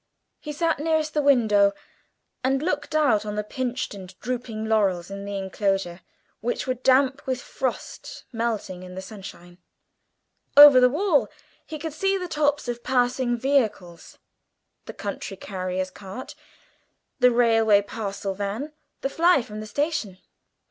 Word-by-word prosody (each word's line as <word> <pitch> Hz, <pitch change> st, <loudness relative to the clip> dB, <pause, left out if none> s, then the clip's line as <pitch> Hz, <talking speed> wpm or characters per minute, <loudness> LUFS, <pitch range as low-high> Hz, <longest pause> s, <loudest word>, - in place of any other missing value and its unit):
He 300 Hz, -, -6 dB
sat 325 Hz, +1 st, 0 dB
nearest 315 Hz, 0 st, 0 dB
the 300 Hz, -, +2 dB
window, 215 Hz, -8 st, +4 dB, 0.7 s
and 270 Hz, +2 st, +1 dB
looked 295 Hz, -2 st, -2 dB
out 245 Hz, -9 st, +3 dB
on 210 Hz, -1 st, -5 dB
the 210 Hz, -, -1 dB
pinched 250 Hz, +3 st, -3 dB
and 190 Hz, -2 st, -11 dB
drooping 235 Hz, -2 st, -4 dB
laurels 195 Hz, -5 st, +1 dB
in 200 Hz, 0 st, -6 dB
the 200 Hz, 0 st, -4 dB
enclosure, 195 Hz, -2 st, -2 dB, 0.4 s
which 240 Hz, +2 st, -2 dB
were 255 Hz, -, 0 dB
damp 265 Hz, +2 st, +2 dB
with 260 Hz, -1 st, -1 dB
frost 255 Hz, 0 st, -5 dB
melting 225 Hz, -6 st, -3 dB
in 180 Hz, 0 st, -10 dB
the 190 Hz, -, -5 dB
sunshine. 185 Hz, -3 st, -11 dB, 1.0 s
Over 290 Hz, -3 st, +11 dB
the 250 Hz, 0 st, +6 dB
wall 315 Hz, +1 st, +2 dB, 0.4 s
he 315 Hz, -, -6 dB
could 310 Hz, 0 st, -5 dB
see 390 Hz, +5 st, +1 dB
the 365 Hz, -1 st, -4 dB
tops 295 Hz, -4 st, 0 dB
of 240 Hz, 0 st, -4 dB
passing 245 Hz, -1 st, +1 dB
vehicles, 225 Hz, -10 st, -1 dB, 0.7 s
the -, -, -8 dB
country 200 Hz, -1 st, -6 dB
carrier's 185 Hz, -1 st, -4 dB
cart, 195 Hz, +6 st, -9 dB, 0.9 s
the 250 Hz, -1 st, +6 dB
railway 225 Hz, -4 st, +4 dB
parcels 200 Hz, -2 st, -5 dB
van, 220 Hz, +10 st, -3 dB, 0.3 s
the -, -, 0 dB
fly 335 Hz, -2 st, +3 dB
from 210 Hz, -1 st, -8 dB
the 215 Hz, -, -7 dB
station. 285 Hz, -, -2 dB
235 Hz, 145 wpm, -24 LUFS, 200-280 Hz, 1.0 s, Over